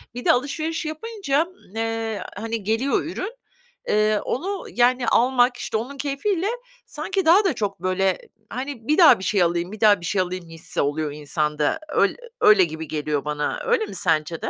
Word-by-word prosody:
Bir 245 - -6
de - - +6
alışveriş 310 +5 -1
yapınca, 315 -2 -1
ımm, 355 - -20
eee, 225 -1 -2
hani, 225 +1 -4
geliyor 225 +7 +1
ürün. 375 +7 -5 0.5
Eee, 215 0 +2
onu 380 +8 -3
yani 245 0 +3
almak, 245 0 +3
işte, 220 - -2
onun 260 +5 -6
keyfiyle 325 +7 -1 0.4
sanki 375 0 -3
daha 375 +6 +6
da 375 - +2
çok, 200 -3 -3
böyle, 185 0 +1 0.3
hani, 255 -2 -6
bir 305 - +2
daha 335 - +7
bir 190 - -7
şey 190 -1 +2
alayım, 170 +2 -1
bir 215 - -9
daha 205 -4 +5
bir 170 - -7
şey 190 +1 +1
alayım 180 -2 -5
hissi 165 0 -4
oluyor 145 +1 -1
insanda. 150 - -1
Öyl - - +2 0.3
öyle 210 -3 +7
gibi 160 -1 -4
geliyor 150 -1 -2
bana, 150 0 -2
öyle 470 -2 +2
mi - - -9
sence 160 -3 0
de? - - -2
225 Hz, 180 wpm, -23 LUFS, 175-295 Hz, 0.5 s, daha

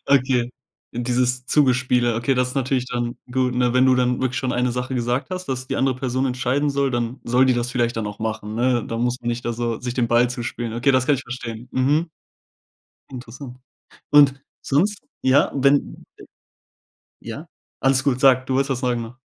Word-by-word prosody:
Okay, 130 -3 +2 0.4
dieses 125 +1 -1
Zugespiele. 125 -4 +2
Okay, 120 +4 +1
das 125 0 +1
ist 125 - -8
natürlich 130 -1 0
dann 120 -1 -3
gut, 125 0 0
ne? 125 -1 +1
Wenn 130 +1 +5
du 130 - +5
dann 125 -1 +1
wirklich 130 0 -1
schon 130 -2 -2
eine 125 0 0
Sache 125 +2 -3
gesagt 125 +5 -1
hast, 185 0 -5
dass 130 -1 -3
die - - -3
andere 135 0 +1
Person 130 0 -1
entscheiden 130 +3 0
soll, 140 -1 0
dann 120 +2 -3
soll 125 +2 +3
die 130 - +3
das 120 0 -2
vielleicht 120 -2 0
dann 110 -2 -2
auch 105 -1 -7
machen, 110 -1 -4
ne? 120 0 +1
Da 115 - -4
muss 125 +1 -1
man 120 - -4
nicht 120 0 -3
dann 120 - -1
so 115 -1 -2
sich 125 0 -4
den 120 -2 0
Ball 120 +1 +3
zuspielen. 120 -2 -4
Okay, 120 +4 +2
das 130 0 +2
kann 145 - +4
ich 135 - -4
verstehen. 120 -2 -7
Mhm. 150 +6 +1 1.0
Interessant. 125 0 -9 0.5
Und 140 -2 +5 0.2
sonst 200 +9 +1 0.2
ja, 130 +1 +3
wenn 140 +1 +1
äh, - - -13 1.0
ja, - - -8 0.3
alles 135 -1 +2
gut. 135 -3 +1
Sag, 130 -1 +4
du 130 - -1
wolltest 135 +1 +1
was 125 - -1
sagen, 120 -2 0
ne? 115 +2 -9
125 Hz, 200 wpm, -22 LUFS, 120-135 Hz, 1.0 s, Wenn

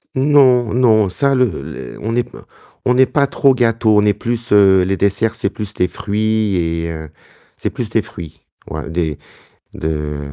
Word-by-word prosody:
Non, 130 -5 +4
non, 110 -5 +3
ça, 140 +9 0
le 130 -1 +4 0.2
les 65 -2 -9
on 110 - -4
n'est 120 +1 +1
pas - - -14 0.4
n'est 125 +1 +4
pas 140 +1 +1
trop 135 0 +3
gâteau, 115 -3 +2
on - - +5
est 105 0 +3
plus, 115 +3 -4
heu, 100 -2 +5
les 95 +1 -1
desserts, 100 +4 0
c'est 100 - -2
plus 105 -1 -7
les 90 - +3
fruits 105 +1 -1
et 85 -1 -2
heu, 80 -1 -7 0.5
c'est - - -3
plus - - -5
des - - +1
fruits, 80 -3 -11 0.3
ouais, - - -6
des 80 -3 -2 0.6
de 75 -1 -3
105 Hz, 180 wpm, -17 LUFS, 90-120 Hz, 0.6 s, on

